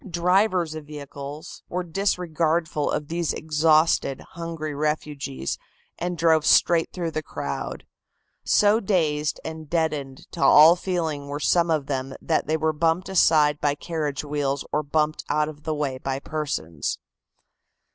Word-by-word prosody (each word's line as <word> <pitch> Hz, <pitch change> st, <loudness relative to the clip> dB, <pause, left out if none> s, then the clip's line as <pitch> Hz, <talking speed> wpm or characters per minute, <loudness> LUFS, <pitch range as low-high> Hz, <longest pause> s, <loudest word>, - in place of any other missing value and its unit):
Drivers 180 Hz, 0 st, +2 dB
of 155 Hz, -2 st, -8 dB
vehicles 145 Hz, 0 st, -8 dB
were 180 Hz, +1 st, -2 dB
disregardful 165 Hz, -4 st, 0 dB
of 150 Hz, -, -2 dB
these 165 Hz, -2 st, -1 dB
exhausted, 155 Hz, -2 st, +2 dB
hungry 165 Hz, -3 st, -5 dB
refugees 145 Hz, -, -3 dB, 0.4 s
and 175 Hz, 0 st, -2 dB
drove 160 Hz, -2 st, +3 dB
straight 165 Hz, +1 st, +4 dB
through 170 Hz, -3 st, -3 dB
the 155 Hz, -, -2 dB
crowd. 70 Hz, -, -5 dB, 0.6 s
So 210 Hz, +2 st, +4 dB
dazed 155 Hz, -8 st, 0 dB
and 160 Hz, -2 st, -7 dB
deadened 150 Hz, -5 st, -2 dB
to 170 Hz, -, -7 dB
all 160 Hz, +3 st, +8 dB
feeling 165 Hz, -6 st, -3 dB
were 145 Hz, +1 st, -4 dB
some 170 Hz, +2 st, +2 dB
of 155 Hz, -4 st, +1 dB
them 135 Hz, -1 st, -3 dB
that 160 Hz, -, 0 dB
they 160 Hz, +1 st, +1 dB
were 160 Hz, 0 st, 0 dB
bumped 165 Hz, +4 st, 0 dB
aside 155 Hz, -5 st, +4 dB
by 145 Hz, -1 st, +1 dB
carriage 150 Hz, -3 st, -3 dB
wheels 145 Hz, -1 st, -2 dB
or 150 Hz, -, +1 dB
bumped 155 Hz, +1 st, 0 dB
out 150 Hz, 0 st, +1 dB
of 150 Hz, -1 st, -10 dB
the 155 Hz, -1 st, -1 dB
way 140 Hz, -3 st, -2 dB
by 135 Hz, 0 st, -2 dB
persons. 140 Hz, -, -3 dB
155 Hz, 145 wpm, -24 LUFS, 145-170 Hz, 0.6 s, all